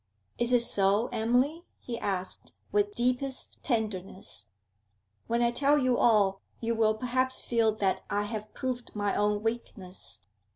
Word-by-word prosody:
'Is 240 +1 +1
it 245 -1 +5
so, 200 +1 +3
Emily?' 250 +9 +1
he 235 -2 -6
asked, 185 -2 -2 0.2
with 410 0 +1
deepest 255 +2 -1
tenderness. 200 - -3 0.8
'When 235 +1 +1
I 235 - +3
tell 280 +4 +3
you 255 -3 +3
all, 205 -5 +3 0.2
you 230 0 0
will 220 -1 +3
perhaps 255 +3 0
feel 230 -2 +2
that 195 -3 0
I 205 0 +1
have 215 0 -5
proved 250 -3 -4
my 205 -1 0
own 210 0 +1
weakness. 225 -5 -5
230 Hz, 140 wpm, -29 LUFS, 205-250 Hz, 0.8 s, it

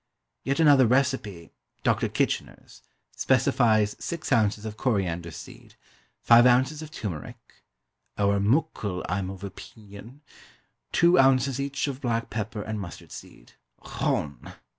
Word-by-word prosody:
Yet 140 +2 -1
another 145 -6 +6
recipe 125 -9 -1 0.3
(DOCTOR - - +1
KITCHENER'S) - - -3 0.3
specifies 120 -5 +2
six 165 -3 -5
ounces 110 -3 +1
of 110 -1 -6
coriander 90 -9 -1
seed, - - -12 0.5
five 120 +1 +7
ounces 130 +5 +2
of 155 - -8
turmeric 95 - -6 0.8
(ower 100 0 +2
muckle, 105 - 0
I'm 95 +1 -2
of 95 -1 -9
opeenion) 105 +5 -11 0.7
two 175 +1 +4
ounces 135 0 +3
each 140 0 -2
of 135 -1 -5
black 115 -2 -2
pepper 105 -1 -4
and 110 -1 -4
mustard 85 -3 -10
seed - - -12 0.3
(_ochone! 70 -4 -3
115 Hz, 120 wpm, -26 LUFS, 100-135 Hz, 0.8 s, five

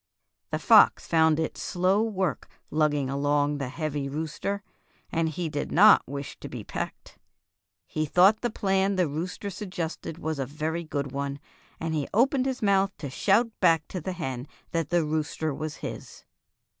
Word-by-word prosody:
" - - -58
The - - 0
fox - - +6
found 160 -1 +3
it 160 - -2
slow 185 +3 +1
work 190 - -1 0.2
lugging 150 -3 +1
along 145 +1 +1
the 135 -2 -3
heavy 145 -1 -3
rooster, 160 +7 -3 0.5
and 165 0 +1
he 165 +2 -3
did 145 -2 -3
not 210 +5 +7
wish 140 +1 -6
to - - -8
be - - -7
pecked. - - -6 0.7
He 155 0 -2
thought 190 +7 +5
the 240 - 0
plan 195 -2 +1
the 180 -3 +2
rooster 175 +7 -4
suggested 175 -4 -5
was 160 -3 -3
a 135 - 0
very 155 +4 -3
good 145 -4 -3
one, 140 0 -3 0.4
and 165 0 -2
he 150 -3 -1
opened 260 +3 +3
his 260 -3 -3
mouth 195 -1 +2
to 140 -4 -6
shout 220 - +2
back 165 -4 +3
to 180 - -4
the 185 +4 -3
hen 130 -6 -4 0.2
that 165 -3 -1
the 175 -2 +2
rooster 155 0 -2
was 155 +1 -5
his. - - -8
160 Hz, 170 wpm, -27 LUFS, 145-190 Hz, 0.7 s, not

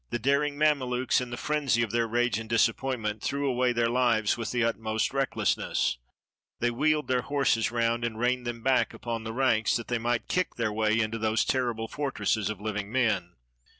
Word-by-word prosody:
The - - -1
daring 140 +4 +1
Mamelukes, 130 -5 +2
in 125 - -5
the 120 - -5
frenzy 140 -6 +1
of 110 - -3
their 115 0 +1
rage 120 +1 +1
and 110 -1 -8
disappointment, 115 -2 0
threw 140 0 -1
away 125 -1 +2
their 120 -1 +1
lives 115 -3 +2
with 115 - -4
the 120 -1 0
utmost 110 0 -1
recklessness. 135 - 0 0.6
They 120 0 +1
wheeled 150 +4 +1
their 125 -1 +1
horses 125 -5 +1
round, 115 0 0
and 115 -2 -2
reined 125 +1 0
them 120 -1 -5
back 130 -1 +2
upon 115 -2 -5
the 110 - -3
ranks, 115 -3 +2
that 115 - -4
they 120 -1 0
might 120 0 -1
kick 185 0 -1
their 115 -3 -1
way 110 +1 +1
into 115 0 -1
those 110 0 +1
terrible 120 -4 -1
fortresses 125 -6 -1
of 110 -3 -5
living 105 -1 -4
men. 120 -4 0
120 Hz, 190 wpm, -28 LUFS, 115-130 Hz, 0.6 s, Mamelukes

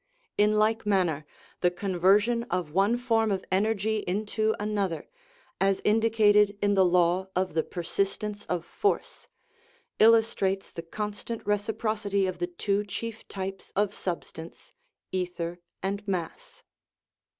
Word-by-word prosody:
In 210 +1 +3
like 220 +1 +2
manner, 180 -8 +1 0.3
the 180 - +3
conversion 195 +5 +2
of 175 -4 -2
one 200 +7 +3
form 225 -3 +1
of 190 -1 -2
energy 215 +2 +1
into 215 +3 0
another, 205 -5 -2 0.5
as 195 0 +2
indicated 210 -2 +4
in 205 0 +2
the 190 -1 +5
law 180 +1 +3
of 185 -1 0
the 160 - +2
persistence 200 +5 -3
of 175 -2 -2
force, 410 - -2 0.7
illustrates 220 -4 +3
the 165 - -6
constant 210 +6 -5
reciprocity 205 -1 0
of 185 -1 -3
the 175 - 0
two 200 +3 -1
chief 220 +3 -6
types 195 0 -6
of 205 0 +1
substance, 170 -3 -6 0.4
ether 175 -2 -3 0.2
and 200 +2 -3
mass. 180 -4 -4
200 Hz, 125 wpm, -28 LUFS, 180-215 Hz, 0.7 s, the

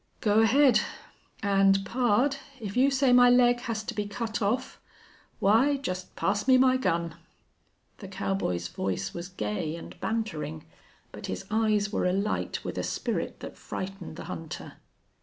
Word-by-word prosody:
"Go 210 0 +3
ahead.... 255 +4 +5 0.6
And, 195 -1 +3
pard, 250 +4 +2 0.2
if 205 -3 -6
you 260 +3 +5
say 270 -2 +3
my 245 0 +7
leg 245 0 +5
has 230 -3 -3
to 235 - -5
be 210 -1 -3
cut 220 +1 -4
off 215 +5 -1 0.6
why 235 +9 +4
just 185 -9 -5
pass 205 +4 0
me 260 -1 +7
my 255 0 +5
gun!" 170 -8 0 0.9
The 195 - -8
cowboy's 185 - -2
voice 95 +1 -3
was 175 +1 -6
gay 150 - -3
and 170 - -10
bantering, 220 - -3 0.5
but - - -8
his 95 - -5
eyes 215 -2 +1
were - - 0
alight 195 +3 -1
with - - -3
a - - -2
spirit - - -3
that - - -9
frightened 190 -3 -6
the - - -7
hunter. 160 -1 -7
210 Hz, 155 wpm, -28 LUFS, 185-245 Hz, 0.9 s, my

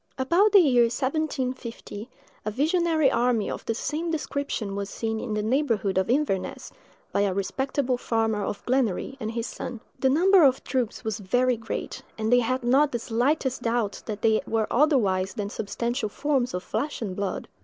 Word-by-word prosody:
About 340 +11 +3
the 405 - +7
year 250 -8 +5
1750, 255 -4 -3 0.3
a - - -2
visionary 315 - +2
army 240 -4 +1
of - - -6
the 225 - 0
same 310 +7 -2
description 280 -9 -3
was 200 0 -3
seen 220 +1 -3
in 220 -3 -3
the 210 - -1
neighborhood 225 -5 +1
of 190 - -1
Inverness, 250 -8 -1 0.4
by - - +1
a 195 -2 +1
respectable 260 +5 -1
farmer, 225 -3 0
of 200 0 -4
Glenary, 255 -1 0
and 215 - -3
his 230 0 -3
son. 245 -1 -6 0.2
The 265 - +3
number 360 +6 +5
of 265 -2 +4
troops 250 -4 -2
was 220 -1 -3
very 245 +6 +2
great, 225 0 -5 0.2
and 220 +2 +1
they 245 - +7
had 255 +2 -1
not 270 +4 +4
the 240 - 0
slightest 250 +4 0
doubt 230 -3 -1
that 210 -2 -5
they 220 -1 +4
were 225 -1 +1
otherwise 220 -10 +2
than 205 -2 -3
substantial 235 +2 -2
forms 265 -2 0
of 180 - -4
flesh 245 +3 -3
and 190 -4 -4
blood. 200 -2 -3
240 Hz, 175 wpm, -26 LUFS, 215-275 Hz, 0.4 s, the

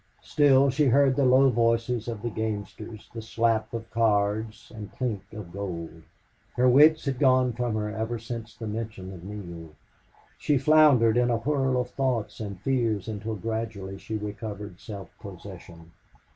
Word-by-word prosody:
Still 140 -2 +4
she 145 +3 +2
heard 135 +1 +4
the 140 - +2
low 130 +1 +5
voices 115 0 +1
of 115 -2 -5
the 120 - -2
gamesters, 110 0 -5
the 115 - -6
slap 110 -1 0
of 115 -1 -5
cards 110 -1 0
and 105 -2 -8
clink 105 -6 -4
of 105 -5 -9
gold. 85 -5 -6 0.5
Her 125 +1 +3
wits 150 +5 +6
had 135 -3 -2
gone 130 -3 +4
from 120 -1 -2
her 105 -1 -2
ever 110 +2 -2
since 115 -1 -7
the 115 - -7
mention 105 -3 -5
of 85 -2 -11
Neale. 85 -6 -9 0.6
She 145 - +2
floundered 135 -5 +5
in 125 0 +3
a 120 - +2
whirl 135 +1 0
of 125 0 -3
thoughts 125 -6 -2
and 100 -4 -6
fears 115 -6 0
until 110 0 -4
gradually 105 -2 -4
she 110 - -4
recovered 105 -2 -7
self 100 -3 -9
possession. 90 -3 -11
115 Hz, 160 wpm, -26 LUFS, 105-125 Hz, 0.6 s, wits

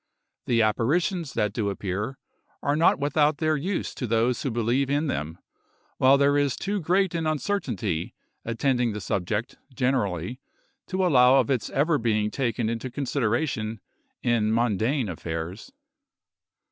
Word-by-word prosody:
The 115 -2 +3
apparitions 155 - 0
that 105 -1 0
do 105 -3 -1
appear, 100 +6 -3 0.5
are 145 - +1
not 160 +2 +4
without 145 +1 +2
their 155 -1 +1
use 180 +7 -2
to 125 - -4
those 115 +2 +1
who 135 - -1
believe 120 +4 0
in 145 +3 +1
them; 80 - -3 0.6
while 135 +2 +6
there 140 +1 +3
is 140 -3 +1
too 205 +1 -2
great 185 +2 +1
an 165 -2 -1
uncertainty 130 - -2 0.3
attending 120 0 0
the 105 - -4
subject, 105 +6 -2
generally 125 - -1 0.5
to 185 0 0
allow 130 -6 +6
of 135 - +3
its 125 -4 0
ever 150 +2 +2
being 110 -2 0
taken 120 -3 -1
into 115 +3 -3
consideration 120 -3 -1 0.4
in 115 -3 +2
mundane 115 +3 +1
affairs. 85 - -5
125 Hz, 140 wpm, -26 LUFS, 110-145 Hz, 0.6 s, while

